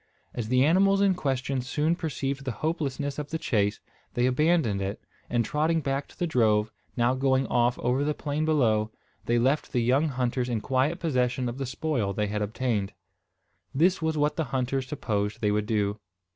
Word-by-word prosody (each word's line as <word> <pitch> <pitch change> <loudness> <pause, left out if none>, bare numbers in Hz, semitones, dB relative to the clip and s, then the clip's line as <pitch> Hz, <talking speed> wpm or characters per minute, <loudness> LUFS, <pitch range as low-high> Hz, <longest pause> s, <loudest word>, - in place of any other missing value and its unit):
As 115 -3 -3
the 130 +3 +4
animals 195 +5 +4
in 200 -1 +4
question 135 -5 -1
soon 150 +6 0
perceived 140 -4 -3
the 130 - -2
hopelessness 145 -3 -2
of 145 -1 -5
the 160 - -2
chase, 105 -8 0 0.4
they 120 - +2
abandoned 130 - +2
it; 95 +2 -3 0.3
and 120 -1 +1
trotting 155 +5 +1
back 140 -1 -2
to - - -19
the 175 - 0
drove, 110 -7 +2 0.3
now 120 +1 +3
going 130 0 +2
off 120 0 +2
over 125 +3 0
the 150 0 0
plain 150 +1 -2
below, 115 -9 +2 0.4
they 120 - +3
left 135 +5 +1
the 125 -3 +1
young 135 +6 +3
hunters 125 -2 -1
in 115 -2 0
quiet 135 +8 0
possession 125 -5 0
of 120 +3 -5
the 135 - -2
spoil 125 -6 -1
they 105 +2 0
had 105 0 -2
obtained. 105 -1 -1 0.8
This 175 +5 +3
was 160 -1 0
what 150 0 +1
the 160 - 0
hunters 130 +1 -1
supposed 105 -7 -2
they 105 -2 +1
would 105 0 0
do. 105 -1 0
130 Hz, 185 wpm, -27 LUFS, 120-150 Hz, 0.8 s, the